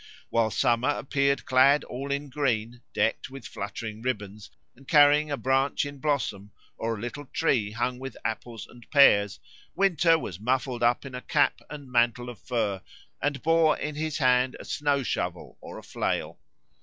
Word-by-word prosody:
While 115 -1 +2
Summer 120 +4 +1
appeared 140 -1 0
clad 135 +2 +5
all 135 +3 -6
in 140 +1 -3
green, 120 -4 -1
decked 110 - 0
with 135 -2 -10
fluttering 105 +2 -6
ribbons, 105 -4 -4 0.3
and 135 +2 -19
carrying 150 0 +5
a 145 - -2
branch 135 +2 +1
in 145 -1 -8
blossom 115 -9 -2 0.2
or 115 0 -3
a - - -9
little 140 +6 -6
tree 125 -10 +1
hung 120 +3 -2
with 135 +1 -7
apples 115 -1 -4
and 120 -2 -17
pears, 105 -9 +5 0.4
Winter 175 -4 +3
was 95 - -6
muffled 125 +2 -1
up 120 +2 +2
in 135 - -8
cap - - +2
and 145 -3 -9
mantle 120 0 +1
of 120 -4 -10
fur 110 -6 -2 0.4
and 145 0 -1
bore 165 -1 +4
in 150 - -4
his 155 0 -3
hand 125 -2 +2
a - - -9
snow 145 -3 0
shovel - - -4
or - - -9
a - - -10
flail. - - -3
130 Hz, 170 wpm, -27 LUFS, 115-145 Hz, 0.4 s, clad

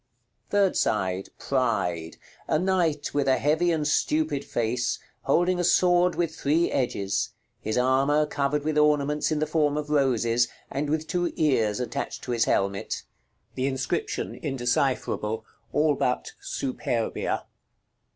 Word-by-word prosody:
§ - - -50 0.4
LXXXVIII. - - -38
Third 200 -2 +3
side. 95 -2 0
Pride. 100 -11 -1 0.3
A - - +2
knight, 175 -4 0
with 140 -1 +1
a 130 - +4
heavy 160 +4 +2
and 155 -3 0
stupid 155 -1 +1
face, 120 +1 -1 0.3
holding 175 +5 +2
a - - +1
sword 175 0 +4
with 165 -2 -1
three 155 +4 +1
edges: 100 -7 -1 0.3
his 110 +2 -2
armor 135 +4 +3
covered 145 0 -1
with 155 0 +1
ornaments 150 0 +2
in 155 - +1
the 155 - +1
form 150 -1 +1
of 150 0 -4
roses, 120 -4 +2 0.2
and 145 +1 -2
with 155 +1 0
two 175 +1 -1
ears 115 -9 +2
attached 125 - -4
to 125 - -4
his 115 -1 +2
helmet. 100 0 -1 0.5
The 130 +1 -1
inscription 135 +5 -2
indecipherable, 120 -5 -1 0.3
all 150 +3 +3
but 125 -2 -1
"SUPERBIA." 120 -3 -2
145 Hz, 140 wpm, -26 LUFS, 120-155 Hz, 0.5 s, a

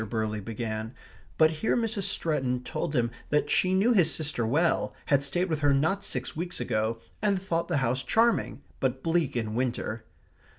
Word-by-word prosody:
Burley 110 -2 -1
began; 110 +2 -4 0.4
but 160 0 +5
here 165 +10 0
Mrs. 220 -4 0
Stretton 130 -8 -1
told 145 - -3
him 120 -2 +1 0.2
that 150 0 +1
she 185 0 +3
knew 215 +6 +4
his 175 -7 +4
sister 145 -7 -2
well; 160 +8 +1
had 140 -2 +3
stayed 175 +7 0
with 160 -4 -1
her 145 -2 +3
not 160 +8 +1
six 130 -7 -4
weeks 175 +3 -3
ago; 115 -1 -1 0.2
and 200 -2 +2
thought 170 -3 -1
the 175 - 0
house 125 +3 0
charming, 225 - +1 0.2
but 130 0 -1
bleak 165 -5 +1
in 110 -2 -2
winter. 120 -2 -2
145 Hz, 175 wpm, -28 LUFS, 120-175 Hz, 0.4 s, but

